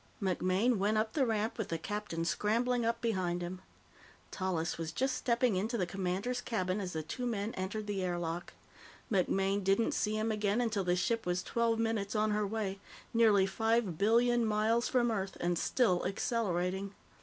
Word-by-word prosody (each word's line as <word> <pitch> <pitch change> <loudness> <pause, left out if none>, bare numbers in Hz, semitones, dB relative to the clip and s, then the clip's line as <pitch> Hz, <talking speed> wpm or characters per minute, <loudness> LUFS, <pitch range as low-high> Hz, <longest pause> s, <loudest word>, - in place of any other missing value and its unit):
MacMaine 190 +4 +1
went 210 +2 +2
up 220 0 0
the 270 -5 +2
ramp 220 +1 -1
with 220 - -1
the 165 - -1
captain 170 -1 -3
scrambling 235 +6 +1
up 230 +1 0
behind 185 -6 -1
him. 180 +1 -6 0.7
Tallis 175 -4 -2
was 165 -1 -3
just 260 +9 0
stepping 245 -3 +1
into 220 +6 -1
the 185 - +1
commander's 195 +7 -2
cabin 185 -3 -1
as 185 -2 -4
the 160 -1 -3
two 245 - -4
men 220 -1 -2
entered 200 +3 -3
the 200 -2 -2
air 175 -1 -1
lock. 170 0 -4 0.6
MacMaine 195 +1 +1
didn't 195 +4 +2
see 215 0 0
him 220 +1 0
again 210 +1 +1
until 220 -5 0
the 180 -1 +2
ship 225 +4 0
was 180 0 0
twelve 230 -1 +1
minutes 225 -2 -1
on 215 0 +2
her 210 0 +1
way 200 -2 -3 0.3
nearly 215 -4 +5
five 225 -3 0
billion 235 +3 +4
miles 220 +2 +2
from 240 -2 +2
Earth 195 -3 -3
and 175 0 0
still 200 -9 +2
accelerating. 195 -2 -1
210 Hz, 180 wpm, -32 LUFS, 185-230 Hz, 0.7 s, nearly